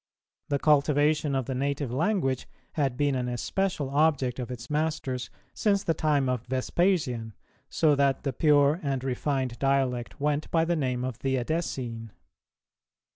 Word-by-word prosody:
The 145 Hz, -, +2 dB
cultivation 150 Hz, 0 st, +3 dB
of 130 Hz, -2 st, 0 dB
the 130 Hz, -, -3 dB
native 140 Hz, 0 st, -2 dB
language 135 Hz, -, 0 dB, 0.2 s
had 135 Hz, -5 st, -1 dB
been 145 Hz, 0 st, +2 dB
an 125 Hz, -1 st, -1 dB
especial 145 Hz, +3 st, -2 dB
object 140 Hz, -4 st, +2 dB
of 125 Hz, -, -4 dB
its 120 Hz, -2 st, -7 dB
masters 150 Hz, -4 st, -2 dB, 0.2 s
since 200 Hz, -2 st, +1 dB
the 165 Hz, -, +1 dB
time 145 Hz, -4 st, +1 dB
of 125 Hz, -2 st, -1 dB
Vespasian, 130 Hz, -, 0 dB, 0.4 s
so 155 Hz, -2 st, +3 dB
that 140 Hz, -1 st, +2 dB
the 135 Hz, -3 st, -1 dB
pure 145 Hz, +2 st, +4 dB
and 135 Hz, -4 st, -2 dB
refined 130 Hz, -1 st, -2 dB
dialect 135 Hz, -3 st, 0 dB
went 150 Hz, +1 st, 0 dB
by 165 Hz, -1 st, +2 dB
the 170 Hz, +1 st, +1 dB
name 130 Hz, -5 st, -1 dB
of 130 Hz, -2 st, -4 dB
the 135 Hz, +2 st, 0 dB
Edessene. 120 Hz, -5 st, -3 dB
140 Hz, 150 wpm, -27 LUFS, 125-150 Hz, 0.4 s, pure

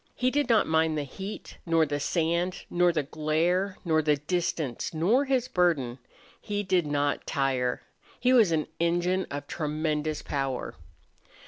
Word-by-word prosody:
He 255 Hz, 0 st, +1 dB
did 290 Hz, -2 st, 0 dB
not 225 Hz, -2 st, +4 dB
mind 160 Hz, -1 st, +2 dB
the 150 Hz, -, -1 dB
heat 190 Hz, +9 st, -8 dB
nor 165 Hz, -2 st, +3 dB
the 145 Hz, -1 st, -2 dB
sand 170 Hz, +4 st, -1 dB
nor 175 Hz, 0 st, +4 dB
the 155 Hz, -3 st, 0 dB
glare 165 Hz, +6 st, 0 dB
nor 160 Hz, -2 st, +3 dB
the 150 Hz, -1 st, +3 dB
distance 155 Hz, -3 st, -2 dB
nor 215 Hz, -, +3 dB
his 260 Hz, -2 st, +1 dB
burden. 150 Hz, -, +1 dB, 0.4 s
He 205 Hz, 0 st, -2 dB
did 185 Hz, -4 st, +1 dB
not 145 Hz, 0 st, -1 dB
tire. 130 Hz, -4 st, 0 dB, 0.4 s
He 250 Hz, +1 st, +3 dB
was 225 Hz, -8 st, +5 dB
an 155 Hz, -2 st, +1 dB
engine 175 Hz, +2 st, +1 dB
of 145 Hz, 0 st, -5 dB
tremendous 155 Hz, 0 st, -2 dB
power. 135 Hz, -3 st, -3 dB
160 Hz, 150 wpm, -27 LUFS, 150-185 Hz, 0.4 s, was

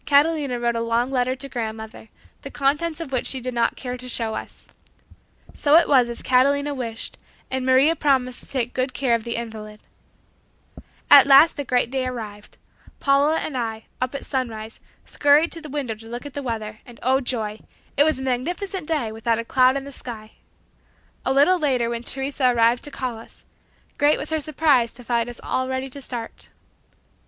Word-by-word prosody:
Catalina 285 Hz, -3 st, +2 dB
wrote 235 Hz, 0 st, 0 dB
a 230 Hz, -, -1 dB
long 230 Hz, +2 st, 0 dB
letter 255 Hz, -1 st, +1 dB
to 275 Hz, +1 st, -7 dB
grandmother, 220 Hz, -3 st, -6 dB, 0.3 s
the 275 Hz, -, -8 dB
contents 295 Hz, +4 st, 0 dB
of 325 Hz, -5 st, -6 dB
which 255 Hz, -2 st, 0 dB
she 265 Hz, -, -1 dB
did 255 Hz, 0 st, -5 dB
not 235 Hz, -1 st, +1 dB
care 250 Hz, -1 st, -5 dB
to 250 Hz, 0 st, -7 dB
show 225 Hz, -2 st, -1 dB
us. -, -, -8 dB, 0.9 s
So 290 Hz, +1 st, +3 dB
it 335 Hz, -, +6 dB
was 255 Hz, -4 st, +4 dB
as 235 Hz, -, -6 dB
Catalina 280 Hz, +3 st, +2 dB
wished, 230 Hz, -4 st, -5 dB, 0.3 s
and 260 Hz, 0 st, -2 dB
Maria 270 Hz, +5 st, +5 dB
promised 260 Hz, -5 st, +2 dB
to -, -, -6 dB
take 250 Hz, -2 st, -2 dB
good 255 Hz, 0 st, -2 dB
care 255 Hz, -4 st, +1 dB
of 230 Hz, -1 st, +1 dB
the 235 Hz, 0 st, -3 dB
invalid. 215 Hz, -2 st, -7 dB, 1.3 s
At 280 Hz, -1 st, +9 dB
last 280 Hz, +4 st, +7 dB
the 285 Hz, -, -3 dB
great 245 Hz, -2 st, 0 dB
day 260 Hz, -1 st, -1 dB
arrived. 215 Hz, -4 st, -7 dB, 0.4 s
Paula 285 Hz, +3 st, +3 dB
and 295 Hz, -, -4 dB
I, 225 Hz, -3 st, -3 dB, 0.2 s
up 255 Hz, +2 st, -2 dB
at -, -, -5 dB
sunrise, 225 Hz, -4 st, -4 dB, 0.3 s
scurried 290 Hz, +3 st, +3 dB
to 330 Hz, -, -4 dB
the 305 Hz, -, -9 dB
window 275 Hz, -5 st, -3 dB
to 225 Hz, +1 st, -13 dB
look 240 Hz, +4 st, -6 dB
at 285 Hz, -, -8 dB
the 285 Hz, -, -4 dB
weather, 220 Hz, -4 st, -5 dB
and 240 Hz, -1 st, -15 dB
oh 265 Hz, +1 st, +3 dB
joy! 220 Hz, -4 st, -3 dB, 0.4 s
It 285 Hz, -, +5 dB
was 310 Hz, -1 st, +2 dB
a -, -, -5 dB
magnificent 340 Hz, +8 st, -3 dB
day 295 Hz, -9 st, -1 dB
without 225 Hz, +1 st, -1 dB
a 230 Hz, -, -4 dB
cloud 255 Hz, +2 st, +4 dB
in 275 Hz, -, -4 dB
the 280 Hz, -, -9 dB
sky! 220 Hz, -5 st, -8 dB, 0.9 s
A -, -, 0 dB
little 290 Hz, +7 st, +4 dB
later 255 Hz, -6 st, +1 dB
when 235 Hz, 0 st, -3 dB
Teresa 270 Hz, +1 st, 0 dB
arrived 235 Hz, 0 st, +3 dB
to -, -, -7 dB
call 255 Hz, -4 st, -4 dB
us, 225 Hz, -, -14 dB, 0.5 s
great 290 Hz, +1 st, +4 dB
was 300 Hz, -, -4 dB
her 315 Hz, -, +1 dB
surprise 285 Hz, -5 st, +2 dB
to 245 Hz, -, -11 dB
find 235 Hz, 0 st, 0 dB
us 240 Hz, -, -8 dB
all 260 Hz, 0 st, -1 dB
ready 260 Hz, 0 st, -3 dB
to 280 Hz, -, -8 dB
start. 240 Hz, -3 st, -7 dB
255 Hz, 195 wpm, -23 LUFS, 235-280 Hz, 1.3 s, At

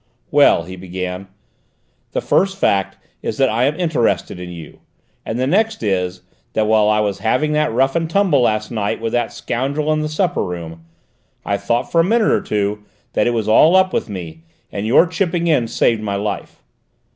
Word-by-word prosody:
"Well," 85 Hz, -, +5 dB
he 95 Hz, +2 st, -9 dB
began, 90 Hz, +1 st, -6 dB, 0.9 s
"the -, -, -1 dB
first 195 Hz, 0 st, +1 dB
fact 100 Hz, -, +1 dB, 0.2 s
is -, -, -4 dB
that 135 Hz, -1 st, +3 dB
I 115 Hz, +3 st, +1 dB
am 150 Hz, +5 st, -1 dB
interested 150 Hz, -, 0 dB
in 90 Hz, 0 st, -7 dB
you, 85 Hz, -3 st, -10 dB, 0.5 s
and 110 Hz, -, -2 dB
the 130 Hz, -, 0 dB
next 215 Hz, -, +1 dB
is, 90 Hz, -3 st, -1 dB, 0.3 s
that 110 Hz, -, +1 dB
while 105 Hz, -1 st, +3 dB
I 105 Hz, 0 st, +3 dB
was 100 Hz, -2 st, -2 dB
having 130 Hz, +7 st, +1 dB
that 150 Hz, -2 st, +1 dB
rough 135 Hz, +4 st, +1 dB
and 165 Hz, -1 st, 0 dB
tumble 180 Hz, -7 st, +3 dB
last 110 Hz, -2 st, 0 dB
night 105 Hz, -3 st, -2 dB
with 115 Hz, 0 st, -3 dB
that 120 Hz, 0 st, 0 dB
scoundrel 135 Hz, +6 st, -2 dB
in 155 Hz, -, 0 dB
the 155 Hz, -, -2 dB
supper 175 Hz, +4 st, 0 dB
room, 85 Hz, -3 st, -7 dB, 0.6 s
I 100 Hz, -, 0 dB
thought 120 Hz, +4 st, -1 dB
for 165 Hz, -, +4 dB
a -, -, +2 dB
minute 220 Hz, +4 st, +2 dB
or -, -, +2 dB
two 105 Hz, 0 st, -2 dB, 0.3 s
that -, -, +2 dB
it 120 Hz, -, +1 dB
was 110 Hz, -2 st, -1 dB
all 155 Hz, +11 st, +5 dB
up 190 Hz, 0 st, +4 dB
with -, -, -1 dB
me: 85 Hz, -5 st, -7 dB, 0.3 s
your 110 Hz, -, +3 dB
chipping 170 Hz, 0 st, -1 dB
in 150 Hz, -8 st, +2 dB
saved 115 Hz, -1 st, +1 dB
my 100 Hz, -2 st, -2 dB
life. 100 Hz, 0 st, -5 dB
115 Hz, 190 wpm, -19 LUFS, 100-155 Hz, 0.9 s, Well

